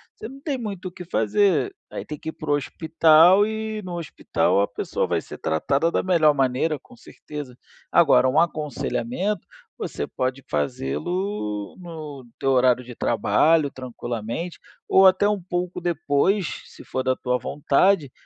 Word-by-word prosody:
você 220 - -8
não 270 +2 -12
tem 280 -2 -2
muito 200 -5 -6
o - - -20
que 180 - -9
fazer, 185 - +1 0.2
aí - - -6
tem 150 -1 -7
que - - -5
ir - - -3
para 155 -1 -4
o - - +5
hospital 160 +6 +4
e 220 0 -4
no 175 -1 -5
hospital 145 -9 0
a 100 - +1
pessoa 100 - -2
vai - - 0
ser - - -10
tratada 140 - 0
da - - 0
melhor 165 -5 +4
maneira, 135 +4 +1
com 250 - -18
certeza. 150 - -9 0.3
Agora, 130 -6 +5
um 130 - +3
aconselhamento, 180 - -1 0.3
você - - -4
pode 130 +1 -3
fazê-lo 105 - -3
no 155 -7 -9
teu 135 - +1
horário 125 -1 +3
de 125 - -10
trabalho, 155 -3 +2
tranquilamente, 120 +5 -5 0.3
ou 190 0 +7
até 190 +2 +4
um 205 -2 0
pouco 180 0 -3
depois, 175 +3 0
se - - -14
for 130 - -3
da 130 0 +1
tua 125 -1 -1
vontade, 145 +1 +2
160 Hz, 160 wpm, -23 LUFS, 130-185 Hz, 0.3 s, ou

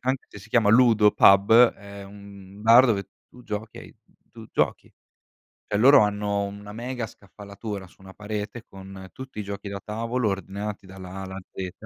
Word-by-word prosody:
chi 125 - -6
anche 130 0 -1
se - - -11
si 105 +3 -15
chiama 110 -3 +3
ludo 110 -3 +5
pub 100 +2 +5 0.2
è 100 0 -11
un 100 -1 -13
un 105 - -12
bar 120 +4 +7
dove 100 -4 -1 0.2
tu 125 - -17
giochi 105 +1 -6
e - - -8
hai - - -14 0.4
tu - - -12
giochi. - - -1 0.8
Cioè 105 - -2
loro 135 +4 +7
hanno 105 -1 -1
una 100 +1 -8
mega 120 0 -5
scaffalatura 100 0 -9
su 90 - -24
una 95 0 -12
parete 105 +2 -6
con 95 0 -11
tutti 130 -4 -10
i - - -3
giochi 100 0 -7
da 100 0 -6
tavolo 115 +2 -2
ordinati 100 +1 -5
dalla 95 -1 -11
A 95 - -6
alla 95 0 -7
Z. 95 -2 -6
105 Hz, 190 wpm, -24 LUFS, 100-110 Hz, 0.8 s, bar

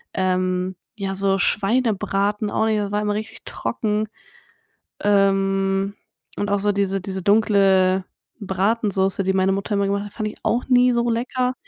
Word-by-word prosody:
Ähm, 185 0 0 0.2
ja, 195 -2 -3
so 195 0 +2
Schweinebraten 205 0 0
auch 220 - 0
nicht, 220 -1 +1
da 205 -1 -2
war 205 0 0
immer 210 0 0
richtig 215 +1 -6
trocken. 215 0 -2 0.9
Ähm, 195 -1 +1 0.4
und 205 0 -2
auch 205 - +2
so 205 +1 +1
diese 195 -1 -1
diese 190 0 -3
dunkle 195 -3 +3 0.3
Bratensoße, 195 -1 0
die 190 +1 +1
meine 190 0 +2
Mutter 200 +2 -2
immer 200 -1 +1
gemacht 200 +1 -1
hat, 205 - -11
fand 215 - -3
ich - - -11
auch 240 - 0
nie 250 0 +5
so 240 0 +1
lecker. 250 +2 -1
200 Hz, 160 wpm, -22 LUFS, 195-215 Hz, 0.9 s, nie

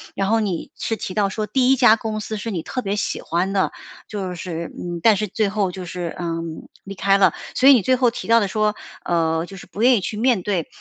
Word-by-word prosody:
然 195 0 0
后 225 +1 +3
你 195 -6 -3
是 225 - -2
提 185 - -5
到 200 0 +2
说 215 +2 -3
第 255 +4 +3
1 - - +6
家 240 -4 +6
公 220 -1 -4
司 215 0 -5
是 225 +2 -4
你 175 -5 -2
特 255 - -4
别 200 -1 -2
喜 205 - -2
欢 175 +3 -1
的， 190 - +1 0.4
就 190 -4 -4
是， 170 -1 -5
嗯， 175 -1 -5
但 220 +3 +5
是 210 +2 -1
最 205 +1 0
后 200 -3 0
就 185 0 -7
是， 175 -1 -5
嗯， 165 -2 -4 0.2
离 195 - -8
开 195 +1 +3
了。 200 - +4 0.2
所 260 - +4
以 - - +10
你 245 - +4
最 260 +6 +2
后 250 -2 +2
提 - - -7
到 230 0 +6
的 205 - 0
说， 210 +2 0 0.3
呃， 165 -1 0
就 195 +2 -11
是 - - -11
不 210 - -7
愿 250 +1 +6
意 - - -2
去 210 - -4
面 235 -3 +2
对， 185 -6 -1
200 Hz, 270 characters per minute, -21 LUFS, 180-220 Hz, 0.4 s, 以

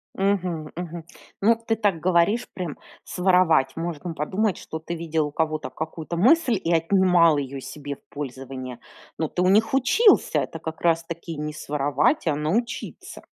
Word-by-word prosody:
Мгм 180 -5 -1
мгм. 170 -1 -6 0.4
Ну, 225 +4 +5
ты 225 0 -2
так 205 -7 0
говоришь, 185 +6 +2
прям 175 -6 -5 0.3
своровать. 180 -6 +3
Можно 165 0 -4
подумать, 190 +7 -1
что 160 - -7
ты 170 +2 -6
видел 160 -2 -1
у 145 - -8
кого-то 155 0 -1
какую-то 160 +1 -5
мысль 245 - +4
и 170 - 0
отнимал 170 -2 +4
её 135 -1 -4
себе 145 +1 -7
в - - -29
пользование. 130 -3 -6 0.4
Но 160 -2 -1
ты 180 - -2
у 180 - +3
них 220 +5 +3
учился. 400 - +4
Это - - -4
как 160 0 -7
раз-таки 165 -1 -1
не 150 0 -4
своровать, 150 - 0
а 150 - +2
научиться. 200 +11 -3
165 Hz, 155 wpm, -24 LUFS, 150-190 Hz, 0.4 s, Ну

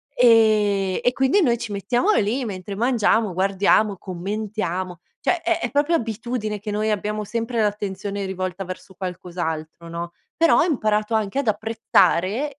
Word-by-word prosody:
ehm, 215 -5 +4
e 245 - +5
quindi 270 +10 +3
noi 240 -8 +3
ci 235 -2 -6
mettiamo 240 - +1
lì 245 - +1
mentre 195 -1 -6
mangiamo 225 -3 +2
guardiamo, 195 +2 +2
commentiamo. 185 -1 -4 0.2
Cioè 355 - +1
è 340 0 +1
è - - -2
proprio 290 +4 +2
abitudine 225 -3 -3
che 210 +2 -7
noi 215 +1 0
abbiamo 210 +1 -2
sempre 230 +2 -3
l'attenzione 205 -1 -2
rivolta 185 0 -4
verso 185 +1 -9
qualcos'altro, 170 -3 -5
no, 170 +1 -5 0.3
però 330 0 +5
ho - - +4
imparato 215 -8 0
anche 215 +4 0
ad 280 - -2
apprezzare 220 - +2
210 Hz, 150 wpm, -22 LUFS, 190-235 Hz, 0.3 s, e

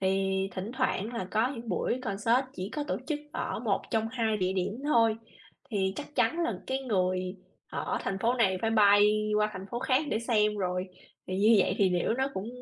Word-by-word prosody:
thì 190 0 +1
thỉnh 190 +3 -5
thoảng 230 -3 -1
là 190 -5 -3
có 220 +3 +2
những 230 -2 -8
buổi 220 +7 -1
concert 230 +4 +1
chỉ 185 +2 -4
có 295 -1 -2
tổ - - 0
chức 300 -1 -2
ở - - -3
một - - 0
trong 225 -2 0
hai 225 -3 0
địa 185 -2 0
điểm 185 +1 -1
thôi, 230 -6 +3 0.5
thì 190 -3 0
chắc 295 0 -7
chắn 335 - +2
là 335 - -1
cái 265 0 -1
người 185 -5 -1 0.3
ở - - -2
thành 195 0 -3
phố 235 +5 +2
này 190 -6 +2
phải 225 - +1
bay 210 0 +5
qua 210 0 +3
thành 190 0 -7
phố 240 - -2
khác 260 +3 +2
để 220 - +1
xem 215 -3 +1
rồi. 180 -1 -1 0.4
Thì 185 0 -3
như 215 +2 +6
vậy 190 - +2
thì 190 -2 +4
liễu 180 +5 +1
nó 265 +2 0
cũng 190 +4 -4
210 Hz, 215 wpm, -29 LUFS, 190-235 Hz, 0.5 s, như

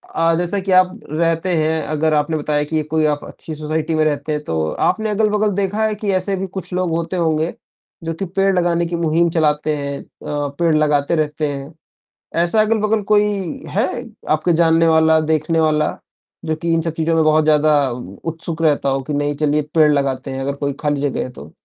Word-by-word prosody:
अ, 165 0 +3
जैसे 180 +3 -1
कि 190 0 -3
आप 185 0 +3
रहते 165 +3 0
हैं, 160 0 +1
अगर 155 +1 0
आपने 150 +1 +1
बताया 150 0 0
कि 155 +1 -1
कोई 160 -1 +2
आप 145 -1 0
अच्छी 160 - -8
सोसाइटी 155 +1 -2
में 155 - +2
रहते 145 0 -1
हैं, 150 0 -2
तो 80 - -1
आपने 220 0 0
अगल-बगल 210 0 +1
देखा 200 +2 0
है 215 -1 0
कि 210 -1 -2
ऐसे 185 +1 0
भी 190 0 -3
कुछ 185 -1 -5
लोग 180 -1 0
होते 170 +2 -3
होंगे, 160 -1 0 0.5
जो 165 0 -3
कि 190 +4 -4
पेड़ 195 0 +3
लगाने 170 -1 +1
की 170 +1 -3
मुहिम 170 0 +2
चलाते 155 -2 +1
हैं 140 0 -4
अ, - - -17 0.5
पेड़ 165 -2 +3
लगाते 150 0 +2
रहते 150 -1 -1
हैं। 140 +2 -6 0.7
ऐसा 215 +5 +3
अगल-बगल 215 0 +1
कोई 210 0 +5 0.4
है, 215 +6 +1 0.4
आपका 155 +3 +2
जानने 165 0 +4
वाला, 160 0 +4
देखने 155 +1 0
वाला 155 -1 +1 0.5
जो 160 0 0
कि 170 +1 -2
इन 165 - +2
सब 165 0 -2
चीज़ों 165 0 0
में 160 - +3
बहुत 155 0 +4
ज़्यादा 150 -2 +4 0.4
उत्सुक 165 0 -3
रहता 150 -3 +2
हो, 135 0 0
कि 150 +3 -5
नहीं 145 0 -1
चलिए 150 0 +1
पेड़ 155 -2 +6
लगाते 135 -2 -1
हैं 135 0 -4
अगर 140 +1 -1
कोई 140 -1 -2
खाली 145 -2 0
जगह 145 -2 -1
है - - -6
तो। 80 - -12
160 Hz, 205 wpm, -19 LUFS, 150-170 Hz, 0.7 s, पेड़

